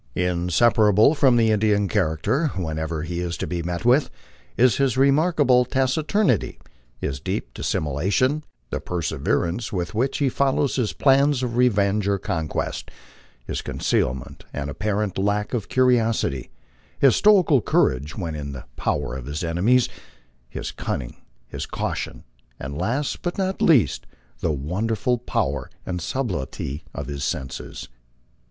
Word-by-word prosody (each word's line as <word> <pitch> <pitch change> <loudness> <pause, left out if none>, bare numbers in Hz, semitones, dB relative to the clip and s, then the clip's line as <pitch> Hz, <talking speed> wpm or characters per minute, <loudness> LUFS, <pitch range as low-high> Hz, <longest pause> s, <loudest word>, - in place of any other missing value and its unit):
Inseparable 105 - +3
from 135 -5 +4
the 115 -2 +4
Indian 105 -1 +2
character, 100 - +1
wherever 80 -2 -3
he 85 +1 -4
is 85 -1 -3
to - - -3
be 85 -1 -3
met 85 +4 -4
with, 130 +4 +4 0.5
is 125 -1 +4
his 135 -3 +1
remarkable 140 -2 +4
taciturnity, 135 - +1 0.4
his 65 -1 -3
deep - - -4
dissimulation, 100 - 0 0.3
the - - -1
perseverance 85 - -1
with 90 -1 -3
which 125 +5 0
he 140 - +1
follows 135 +1 +1
his 120 -5 0
plans 140 -1 +3
of 120 -2 -2
revenge 105 -4 +2
or 100 0 +2
conquest, 80 -4 -3 0.6
his - - -3
concealment 65 -1 -2
and 70 0 -4
apparent 105 +3 -2
lack 105 +3 0
of 115 -5 -2
curiosity, 115 - +2 0.5
his 135 -3 +5
stoical 185 - +5
courage 70 -6 +1
when 85 -5 -3
in 70 -2 -5
the 65 -1 -8
power 70 -3 -1
of 65 -1 -7
his 75 +4 -4
enemies, 100 +10 +3 0.6
his - - -5
cunning, 60 -4 -4 0.3
his - - -6
caution, - - -4 0.4
and 70 +1 -6
last, 120 - -1
but 175 - -3
not 190 -1 -1
least, 140 - +3 0.3
the 80 - 0
wonderful 105 - -1
power 70 - -2 0.2
and 90 -1 -3
subtlety 80 - -3
of - - -5
his 70 -1 -5
senses. 65 -2 -4
105 Hz, 135 wpm, -23 LUFS, 80-130 Hz, 0.6 s, his